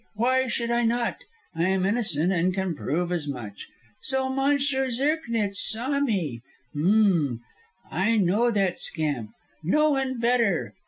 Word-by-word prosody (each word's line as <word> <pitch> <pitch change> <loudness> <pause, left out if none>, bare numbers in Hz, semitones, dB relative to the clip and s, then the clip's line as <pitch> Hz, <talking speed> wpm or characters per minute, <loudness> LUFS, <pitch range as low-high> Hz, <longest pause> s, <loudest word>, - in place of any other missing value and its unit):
Why 260 +4 +2
should 235 0 -2
I 240 0 +2
not? 235 +1 0 0.4
I 165 0 0
am 190 0 +1
innocent 190 -6 +1
and 180 0 +1
can 190 -2 -1
prove 170 +5 -2
as 165 -4 -2
much. 120 -7 -7 0.3
So 265 0 -1
Monsieur 270 0 +1
Zirknitz 235 -6 0
saw 255 +5 +1
me? 180 - -1 0.3
H'm! 170 - +2 0.5
I 225 +4 +1
know 210 +5 +3
that 195 -5 0
scamp; 145 -9 -2 0.3
no 300 - +3
one 265 -3 -1
better. 235 -6 +1
215 Hz, 140 wpm, -25 LUFS, 175-255 Hz, 0.5 s, know